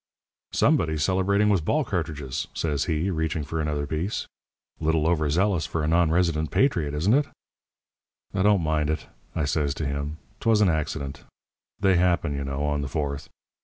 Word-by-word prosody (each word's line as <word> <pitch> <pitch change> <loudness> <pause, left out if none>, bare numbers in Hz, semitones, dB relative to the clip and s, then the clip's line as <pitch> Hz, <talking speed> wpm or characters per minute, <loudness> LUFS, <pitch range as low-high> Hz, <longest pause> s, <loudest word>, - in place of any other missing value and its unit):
"'Somebody's 80 -2 +2
celebrating 95 +4 +2
with 100 -6 +2
ball 155 - +1
cartridges,' 75 -8 -3
says 75 -3 0
he, 85 +3 0
reaching 80 -2 -1
for 80 +3 -3
another 75 -1 -1
piece. 80 +8 -2 0.5
'Little 80 -1 +1
over 80 -3 +2
zealous 90 0 +1
for 80 -1 -2
a - - 0
non 85 0 +3
resident 80 -2 +1
patriot, 85 - +1
isn't 90 +9 +2
it?' 145 +2 +3 1.1
"'Don't 100 -1 +3
mind 80 -1 +1
it,' 80 - -2 0.3
I 75 - 0
says 75 -1 0
to 80 - -3
him. 70 +2 -3 0.2
''Twas 115 -2 +3
an 105 -3 +4
accident. 75 -3 -2 0.6
They 95 -2 +4
happen, 85 -4 +2
you 70 0 -3
know, 70 +1 -2
on 75 -1 0
the 70 - -3
Fourth. 70 -2 -3
80 Hz, 165 wpm, -25 LUFS, 75-90 Hz, 1.1 s, an